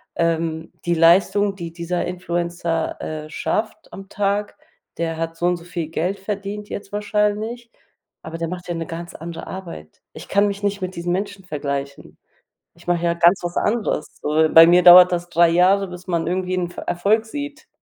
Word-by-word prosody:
ähm, 165 -1 -1
die 175 - +1
Leistung, 195 +4 +4
die 170 -3 -7
dieser 170 +1 -3
Influencer, 170 -2 -3
äh, 155 -1 -6
schafft 215 +7 -3
am 195 0 -10
Tag 205 +1 -1 0.4
der 165 -1 -2
hat 165 0 -3
so 175 - 0
und 180 0 +1
so 170 - -13
viel 170 -2 -5
Geld 175 +5 -2
verdient 205 +1 -5
jetzt 200 - -7
wahrscheinlich, 210 +3 -1 0.5
aber 165 +1 -7
der 165 - -3
macht 180 +1 -7
ja 175 - -3
'ne 165 0 -4
ganz 170 +1 -8
andere 165 +1 -8
Arbeit.” 165 - -9
Ich - - -10
kann 200 +1 +3
mich 200 0 -4
nicht 200 -1 -1
mit 185 0 -4
diesen 170 +1 -3
Menschen 195 0 -4
vergleichen, 140 -3 -5 0.6
ich - - -20
mache 175 -1 0
ja 170 0 +2
ganz 170 +2 +4
was 175 0 -4
anderes. 210 -8 0 0.2
So 155 +1 +2
bei 165 0 +10
mir 175 +1 +5
dauert 180 0 +9
das 175 0 -2
3 170 0 +4
Jahre, 185 +3 +3
bis 180 +1 -10
man 170 -2 0
irgendwie 185 +1 -1
'n 180 - -1
F - - -16
Erfolg 210 +6 +1
sieht, 290 +4 -7
175 Hz, 190 wpm, -21 LUFS, 165-200 Hz, 0.6 s, bei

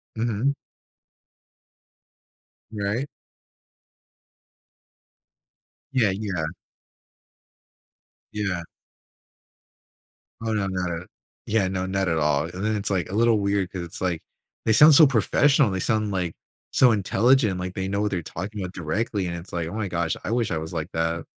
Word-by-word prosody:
Mhm. 115 +4 0 2.2
Right? 105 +6 -2 2.9
Yeah, 115 -7 +3
yeah. 95 -5 -2 1.9
Yeah. 95 -5 -2 1.8
Oh, 110 - 0
no, 100 -2 0
not 90 -2 -2
at 85 +2 -5 0.4
Yeah, 105 -3 +1
no, 95 0 -2
not 95 0 -1
at 80 -2 +1
all 75 -1 +2
and 90 +4 -6
then 110 0 +1
it's, 100 -1 -2
like, 95 -3 -1
a 95 - -4
little 115 0 +4
weird 100 -2 0
'cause 95 - -5
it's, 85 -1 -8
like, 90 -3 -1 0.4
"They 110 - +4
sound 150 +7 +8
so 150 +1 +9
professional. 135 +1 +3
They 95 - -2
sound, 110 +2 0
like, 90 -3 -2 0.4
so 125 -2 +5
intelligent. 110 0 +3
Like, 90 0 -4
they 95 0 -3
know 100 +1 -1
what 105 - 0
they're 90 -3 -1
talking 100 +6 -6
about 90 -1 -5
directly," 95 +4 -2
and 85 -1 -3
it's, 85 +2 -9
"Oh 85 -1 -3
my 110 -2 -2
gosh. 85 -2 -1
I - - -3
wish 120 -4 0
I 80 - 0
was 80 0 -6
like 80 -2 -4
that." 80 0 -1
95 Hz, 145 wpm, -24 LUFS, 90-110 Hz, 2.9 s, so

